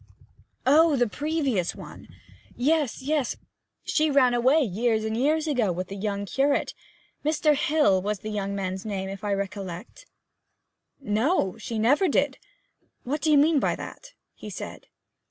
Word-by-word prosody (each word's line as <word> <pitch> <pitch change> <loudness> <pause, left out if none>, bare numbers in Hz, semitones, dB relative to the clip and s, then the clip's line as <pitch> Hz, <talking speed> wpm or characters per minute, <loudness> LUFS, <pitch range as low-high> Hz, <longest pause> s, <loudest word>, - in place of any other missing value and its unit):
'Oh, 305 +3 +5
the 245 -2 +2
previous 280 - -1
one! - - -11 0.5
Yes, 285 -1 0
yes. 290 -2 0 0.5
She 310 0 +1
ran 265 -4 +4
away 260 +6 +4
years 220 +1 0
and 220 0 -2
years 300 +6 +1
ago 250 - +1
with 180 +1 -4
the 195 - -6
young 200 0 -3
curate. 270 +9 0 0.5
Mr. 305 0 +2
Hill 295 - +2
was 210 +2 -2
the 215 - -5
young 200 -1 -3
man's 190 -1 -3
name, 195 -3 -4
if 195 +2 -8
I 205 - -1
recollect.' 195 0 -5 0.9
'No! 225 - 0
She 230 - -5
never 275 - +3
did. - - +1 0.6
What 290 +5 -3
do 315 - +2
you 295 - +6
mean 300 +1 +4
by - - 0
that?' - - -10 0.2
he - - -10
said. - - -8
245 Hz, 155 wpm, -26 LUFS, 200-300 Hz, 0.9 s, you